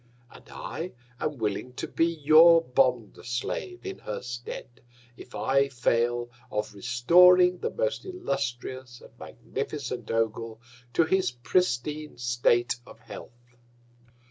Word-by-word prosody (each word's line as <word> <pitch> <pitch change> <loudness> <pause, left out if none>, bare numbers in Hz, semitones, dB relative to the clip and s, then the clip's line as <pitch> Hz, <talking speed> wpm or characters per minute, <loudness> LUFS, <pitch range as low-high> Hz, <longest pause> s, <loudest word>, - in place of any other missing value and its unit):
And - - -16
I 175 +3 -6 0.3
am 150 -2 -2
willing 110 +3 -3
to - - -5
be 165 - +1
your 165 +1 +6
Bond 125 -5 +1
slave 125 - -4
in 390 0 -6
her - - -6
Stead, 120 0 -8 0.3
if 125 - -12
I 135 +1 +2
fail 120 -1 0 0.2
of 105 0 -3
restoring 180 - +5
the - - -2
most - - -2
illustrious 130 - -4
and - - -15
magnificent 130 +1 -6
Ogul 115 0 -2 0.3
to 165 - +4
his 190 +4 +1
pristine 150 +3 -1
State 120 0 +1
of - - -14
Health. 120 +1 -13
125 Hz, 120 wpm, -27 LUFS, 120-165 Hz, 0.3 s, your